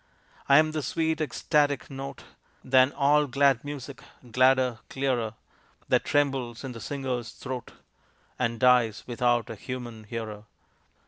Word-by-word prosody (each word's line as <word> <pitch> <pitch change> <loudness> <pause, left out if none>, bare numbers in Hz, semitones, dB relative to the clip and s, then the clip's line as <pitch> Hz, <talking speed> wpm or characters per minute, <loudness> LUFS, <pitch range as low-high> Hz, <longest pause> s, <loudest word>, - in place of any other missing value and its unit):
I 140 - +8
am 155 0 +4
the 155 0 -2
sweet 160 +4 -1
ecstatic 145 0 +1
note 135 0 -7 0.4
Than 130 +1 +4
all 145 +1 +3
glad 140 -2 +3
music 140 -2 -7 0.3
gladder, 130 -1 +3
clearer, 125 -5 -1 0.5
That - - +3
trembles 135 -5 0
in 135 - -5
the 115 -2 -9
singer's 130 -3 -3
throat, 130 -3 -7 0.7
And 115 -2 -1
dies 125 -4 +4
without 120 -1 0
a - - -6
human 120 -1 -7
hearer. 110 -1 -6
130 Hz, 130 wpm, -27 LUFS, 120-140 Hz, 0.7 s, I